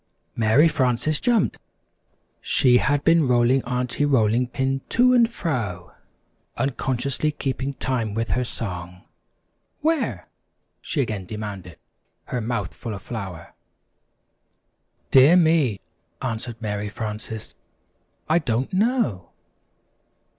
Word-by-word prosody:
Mary 115 +8 +4
Frances 145 0 +1
jumped. 235 -5 +1 0.8
She 125 -2 +4
had 140 +7 +1
been 165 -3 +4
rolling 125 +1 +3
Aunty 125 +2 -1
Rolling 125 -3 +2
Pin 135 +1 -1
to 250 +1 +4
and 235 -2 +5
fro, 115 - -4 0.6
unconsciously 135 +2 -1
keeping 140 -1 -3
time 115 -6 -2
with 115 0 -2
her 125 - +1
song. 90 -6 -6 0.8
"Where?" 320 -2 0 0.5
she 145 - -1
again 105 -7 -3
demanded, 100 -4 -7 0.5
her 125 - -3
mouth 110 -4 -3
full 115 -4 -6
of 100 - -10
flour. 95 -8 -7 1.6
"Dear 135 +7 +7
me," 160 - +3 0.4
answered 115 -1 -4
Mary 105 -2 -3
Frances, 110 0 -6 0.7
"I 160 +2 +3
don't 125 -2 -2
know." 200 - 0
125 Hz, 105 wpm, -23 LUFS, 110-145 Hz, 1.6 s, Dear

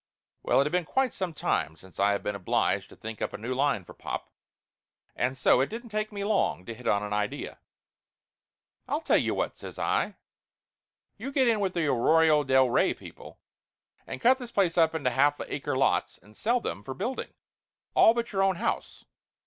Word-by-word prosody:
Well, - - +2
it - - +5
had 150 - -2
been 180 0 +1
quite 265 +8 0
some 185 -2 -3
time 80 - -1
since 95 +2 -16
I 100 +1 +4
had 100 - -3
been 105 - -2
obliged 100 -3 0
to - - -14
think 110 0 -8
up - - -2
a - - -4
new 120 +4 -4
line 130 -8 +1
for - - -12
pop, - - -6 0.8
and 130 +2 -1
so 125 0 +4
it 135 - 0
didn't 235 +2 -7
take 215 +1 -2
me 200 -1 -4
long 200 - 0
to 115 - -6
hit 125 +2 -9
on 100 0 +2
a 105 0 -2
idea. 105 0 -3 1.3
"I'll - - -1
tell - - +3
you - - 0
what," - - -2
says - - -9
I - - 0 1.0
"you 255 +6 -5
get 270 -2 +3
in 225 -2 +3
with 190 -3 -1
the 170 -2 +1
Arroyo 155 +3 +4
bel 130 -1 +4
Rey 120 - +2
people, - - -12 0.7
and - - -6
cut 260 - +4
this 245 -2 -7
place 190 -7 +1
up 165 -1 +3
into 140 -5 0
half 145 +4 +3
acre 135 -2 -3
lots 135 - +1
and 105 +1 -20
sell 240 - +1
them 100 - -5
for 130 - -6
building, 240 - -4 0.6
all 225 - +6
but 235 0 -2
your 195 -2 0
own 195 -1 +3
house. - - -3
150 Hz, 205 wpm, -28 LUFS, -, 1.3 s, all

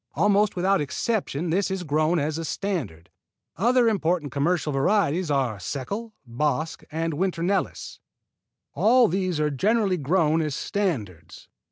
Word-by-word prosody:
Almost 205 0 +3
without 190 +1 +2
exception 170 - -2
this 195 +4 +1
is 190 -1 -3
grown 155 +2 +1
as 155 +1 -1
a - - -3
standard. 140 - -4 0.4
Other 240 +5 +3
important 175 - 0
commercial 150 +3 0
varieties 175 +2 +1
are 130 -7 0
Seckel, 200 - -5
Bosc 150 +6 -2
and 165 +1 -2
Winter 170 +1 -1
Nelis. 195 +3 -2 0.7
All 240 +2 +4
these 185 -2 -1
are 150 -1 +1
generally 200 - +1
grown 160 +1 +2
as 150 -3 -2
standards. 135 - -4
165 Hz, 135 wpm, -25 LUFS, 145-195 Hz, 0.7 s, All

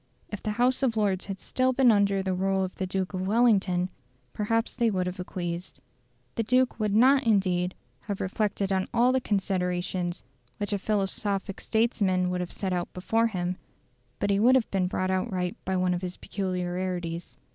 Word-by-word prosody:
If 210 - -6
the 215 - -2
House 250 +2 +3
of 240 -4 +1
Lords 195 -3 0
had 195 -1 -5
still 255 +5 0
been 255 -2 +5
under 200 -2 +2
the 190 -1 -1
rule 190 +1 +1
of 185 - -4
the 190 - -3
Duke 190 +1 -2
of 185 0 -2
Wellington, 200 -5 +3 0.5
perhaps 225 +2 0
they 235 -2 +2
would 185 -3 0
have 180 0 -4
acquiesced. 175 -3 -5 0.5
The - - -1
Duke 250 +3 +2
would 210 -1 0
not 265 +4 +5
indeed 185 -4 +2 0.2
have 200 -3 -5
reflected 200 0 -1
on 190 0 +1
all 240 +2 +5
the 260 0 +1
considerations 180 -3 -1 0.3
which 205 0 -2
a 200 - 0
philosophic 200 -1 -1
statesman 200 -5 +1
would 180 0 -1
have 180 - -4
set 190 -2 -2
out 175 -1 -2
before 225 +5 +1
him; 180 -4 -2 0.6
but 205 - 0
he 200 - +2
would 250 +5 +6
have 255 -4 +1
been 190 -2 +1
brought 185 0 -1 0.2
right 180 -1 -2
by 190 0 0
one 180 0 +2
of 175 - -2
his 180 -1 -5
peculiarities. 180 -2 -3
195 Hz, 185 wpm, -27 LUFS, 180-215 Hz, 0.6 s, would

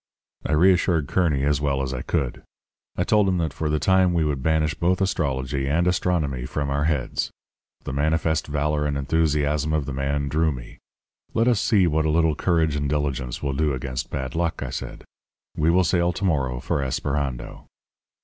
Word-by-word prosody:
"I - - -1
reassured 85 -2 +3
Kearny 80 -5 +1
as 70 0 +1
well 70 -2 0
as 65 0 -2
I 65 - -4
could. - - -2 0.5
I 90 - 0
told 105 0 +3
him 90 - +1
that 80 -2 -1
for 75 - -2
the 75 - +1
time 95 +2 +3
we 80 -2 +2
would 70 -3 -1
banish 80 +1 +1
both 90 +2 +1
astrology 70 -7 -1
and 80 +5 +2
astronomy 80 -8 0
from 70 0 -2
our 70 +1 0
heads. 75 -5 -1 0.5
The - - -5
manifest 80 +2 0
valour 75 0 0
and 70 -1 -1
enthusiasm 75 0 +1
of 75 -3 0
the 70 - -5
man 70 +2 -1
drew 80 +3 +1
me. - - -9 0.6
'Let 115 +2 +3
us 120 -4 +3
see 100 -5 +3
what 80 -1 +1
a - - +2
little 80 0 +3
courage 80 -1 +1
and 70 -1 -1
diligence 70 -4 -2
will 70 -1 -1
do 75 +1 +1
against 65 -1 -4
bad 65 -3 -4
luck,' 85 -1 -1
I - - -5
said. - - -6 0.5
'We 75 +2 +2
will 90 +2 +4
sail 85 -1 +2
to 100 - -3
morrow 65 -8 0
for 70 - -1
Esperando.' 65 -2 -3
75 Hz, 190 wpm, -24 LUFS, 70-85 Hz, 0.6 s, will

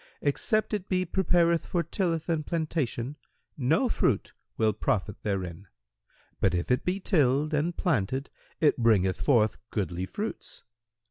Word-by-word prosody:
Except 215 +10 +1
it 205 -2 -3
be 185 -1 +1
prepared 170 -2 +2
for 175 -2 -1
tilth 165 -1 -1
and 165 -3 0
plantation 150 -5 -2 0.4
no 150 - +2
fruit 130 - 0 0.2
will 110 -1 +3
profit 105 0 -1
therein; 95 -2 -3 0.7
but, 95 -2 +2
if 85 +7 -1
it 125 - +2
be 185 +2 -1
tilled 150 -5 +2
and 160 +4 0
planted, 135 - 0 0.3
it 150 - +4
bringeth 105 -6 +3
forth 110 -6 +3
goodly 95 -3 -2
fruits. 210 - -6
145 Hz, 135 wpm, -28 LUFS, 110-170 Hz, 0.7 s, it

